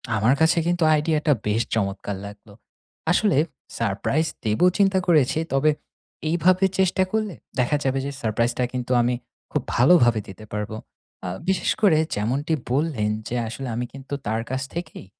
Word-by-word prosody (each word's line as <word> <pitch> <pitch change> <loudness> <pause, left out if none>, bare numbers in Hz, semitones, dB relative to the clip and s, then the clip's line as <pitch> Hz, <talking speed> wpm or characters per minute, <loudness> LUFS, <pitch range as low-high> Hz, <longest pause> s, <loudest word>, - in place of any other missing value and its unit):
আমার 110 +4 +3
কাছে 160 +2 +4
কিন্তু 175 -1 +1
আইডিয়াটা 150 0 +2
বেশ 105 +2 +2
চমৎকার 100 -1 -2
লাগলো। 100 +1 -12 0.6
আসলে 190 -3 +3 0.4
সারপ্রাইজ 115 +8 0 0.2
দিব 110 -2 0 0.2
চিন্তা 195 -2 +3
করেছি, 155 -3 +3
তবে 135 +3 +3 0.6
এইভাবে 180 +3 +3
চেষ্টা 190 0 +3
করলে 215 -5 -1 0.2
দেখা 125 +4 +2
যাবে 135 0 +1
যে, 140 - -3
সারপ্রাইজটা 115 +2 0
কিন্তু 125 0 -3
আমি 120 +1 +1 0.4
খুব - - 0
ভালোভাবে 120 -4 +5
দিতে 95 +3 -11
পারবো। 105 +1 -3 0.5
আ - - -2 0.2
বিশেষ 190 -2 +1
করে 190 -8 +5 0.2
যেমনটি 130 +10 -1 0.2
বললেন 135 -6 0 0.2
যে, 125 - -3
আসলে 130 +4 -6
আমি 120 +1 -2
কিন্তু 135 +1 -9
তার 110 +2 0
কাছ 130 +1 -2
থেকেই 170 - -6
135 Hz, 150 wpm, -23 LUFS, 110-165 Hz, 0.6 s, ভালোভাবে